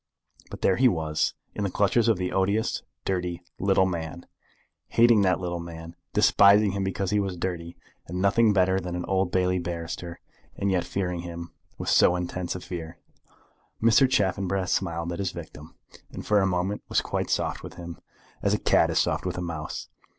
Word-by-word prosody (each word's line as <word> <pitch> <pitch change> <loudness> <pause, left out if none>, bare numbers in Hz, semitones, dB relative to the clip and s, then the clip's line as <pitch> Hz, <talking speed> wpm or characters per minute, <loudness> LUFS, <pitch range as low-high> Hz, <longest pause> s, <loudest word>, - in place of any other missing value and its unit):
But - - -9
there 95 - +3
he 130 - +5
was, 80 -7 0 0.2
in 105 - -3
the 100 - 0
clutches 105 +5 +2
of 115 -4 +3
the 90 0 -2
odious, 100 +3 0 0.2
dirty, 90 -2 -2 0.2
little 95 -1 +3
man, 85 -1 -4 0.6
hating 115 -2 +5
the 95 -2 +3
little 85 -1 -3
man, 85 0 -9 0.2
despising 100 0 +5
him 100 0 -2
because 95 0 -2
he 105 - +2
was 95 -3 -2
dirty, 85 -1 -4 0.3
and 90 +2 -4
nothing 105 +3 +4
better 95 -1 +3
than 90 -1 -5
an 90 - -3
Old 95 -1 0
Bailey 90 0 +1
barrister, 85 0 -5 0.4
and 100 0 0
yet 90 -2 +1
fearing 90 -1 -2
him 85 0 -7 0.3
with - - -3
so 90 - +5
intense 90 0 -3
a 90 - -6
fear! 85 -3 -7 0.8
Mr. 115 +4 +5
Chaffanbrass 95 -3 0
smiled 85 -2 -1
at 85 - -6
his 95 -2 -2
victim, - - -10 0.4
and - - -8
for 105 -1 +3
a 95 - +2
moment 95 +2 -1
was - - +2
quite - - -3
soft - - -1
with - - -9
him, 85 -1 -8 0.4
as - - +2
a - - 0
cat - - +3
is - - -1
soft - - +1
with - - -3
a - - -2
mouse. 80 -3 -5
90 Hz, 185 wpm, -26 LUFS, 85-100 Hz, 0.8 s, he